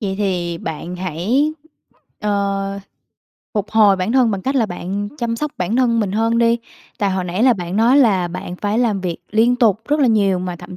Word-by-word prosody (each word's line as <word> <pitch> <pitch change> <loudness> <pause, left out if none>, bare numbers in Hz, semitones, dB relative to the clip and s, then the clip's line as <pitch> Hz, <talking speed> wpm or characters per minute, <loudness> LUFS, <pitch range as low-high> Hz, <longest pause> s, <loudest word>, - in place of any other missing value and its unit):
Vậy 195 -3 -2
thì 175 -4 -1
bạn 170 +3 -6
hãy, 190 - 0 0.7
ờ 200 -1 -1 0.8
phục 210 -1 -2
hồi 210 -3 +5
bản 185 +4 -1
thân 255 -3 +4
bằng 195 -2 -3
cách 270 +6 -1
là 240 -5 +2
bạn 195 +2 -4
chăm 235 -1 -2
sóc 300 +4 -3
bản 185 +6 -1
thân 235 -3 +2
mình 200 -3 -1
hơn 225 +2 +1
đi. 235 0 +3 0.4
Tại 200 -2 +1
hồi 190 -1 -1
nãy 180 +4 -2
là 255 0 +6
bạn 180 -3 -4
nói 235 +5 +4
là 195 -9 +3
bạn 175 0 -6
phải 205 +3 -1
làm 220 -5 +1
việc 175 -3 -3
liên 230 +3 +3
tục 220 -5 +3
rất 295 +1 +2
là 275 - +4
nhiều 200 -5 +2
mà 180 -1 -4
thậm 180 - -10
205 Hz, 210 wpm, -19 LUFS, 185-230 Hz, 0.8 s, là